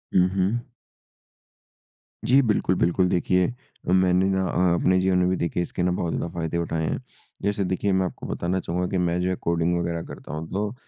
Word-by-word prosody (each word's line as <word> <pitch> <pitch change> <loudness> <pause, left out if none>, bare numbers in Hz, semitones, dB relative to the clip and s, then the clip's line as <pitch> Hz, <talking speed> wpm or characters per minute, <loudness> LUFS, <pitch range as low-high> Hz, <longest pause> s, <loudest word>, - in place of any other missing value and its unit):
हुँ, 90 0 +6
हुँ। 100 +5 +1 1.7
जी, 135 +3 +5
बिल्कुल, 105 -5 +1
बिल्कुल 90 +2 +2
देखिए 90 0 +2 0.4
अ, - - +3
मैंने 95 0 +4
ना 95 0 +1
अ 90 -1 +2
अपने 95 +1 +3
जीवन 95 0 +2
में 90 0 +3
भी 95 - +2
देखिए 85 +1 -1
इसके 90 - -3
ना 90 - +2
बहुत 85 -2 -1
ज़्यादा 85 - -3
फ़ायदे 85 0 -2
उठाएँ 80 -1 -1
हैं। - - -1 0.4
जैसे 100 0 0
देखिए 95 +2 0
मैं 95 0 +2
आपको - - -6
बताना 90 +2 -1
चाहूँगा 90 +1 -2
कि 95 - -1
मैं 90 0 +1
जो 95 0 0
कोडिंग 85 +1 +1
वगैरह 85 -1 -2
करता 75 - -9
हूँ, 80 +1 -4
तो 105 +3 -2
90 Hz, 200 wpm, -25 LUFS, 85-95 Hz, 1.7 s, हुँ